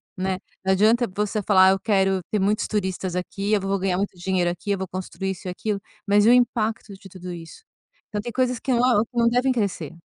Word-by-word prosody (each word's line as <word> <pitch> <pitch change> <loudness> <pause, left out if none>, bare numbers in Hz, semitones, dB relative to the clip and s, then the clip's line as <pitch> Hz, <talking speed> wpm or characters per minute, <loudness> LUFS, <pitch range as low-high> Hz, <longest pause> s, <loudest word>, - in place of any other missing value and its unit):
né. 190 0 -1 0.3
Não 190 0 +2
adianta 225 +5 +3
você 210 +1 -1
falar: 190 -1 +5
"Eu 195 - +1
quero 195 -2 +2
ter 210 - 0
muitos 205 +2 +1
turistas 190 -3 -2
aqui, 195 +3 -2
eu 210 - +4
vou 195 0 -1
ganhar 185 -1 0
muito 200 -1 -2
dinheiro 180 -1 0
aqui, 175 +4 -8
eu 200 - +1
vou 190 0 -4
construir 185 +1 -4
isso 190 0 -8
e - - -2
aquilo", 205 +3 -3 0.3
mas 205 +1 +4
e - - +7
o 245 - +7
impacto 225 -4 +1
de 195 0 -13
tudo 180 -1 -8
isso? 165 - -11 0.5
Então 210 -1 -3
tem 240 - -6
coisas 250 0 0
que 265 - -2
não 240 -3 +3
que 245 - -13
não 235 0 +4
devem 250 +3 +2
crescer. 190 - -2
200 Hz, 230 wpm, -23 LUFS, 190-220 Hz, 0.5 s, e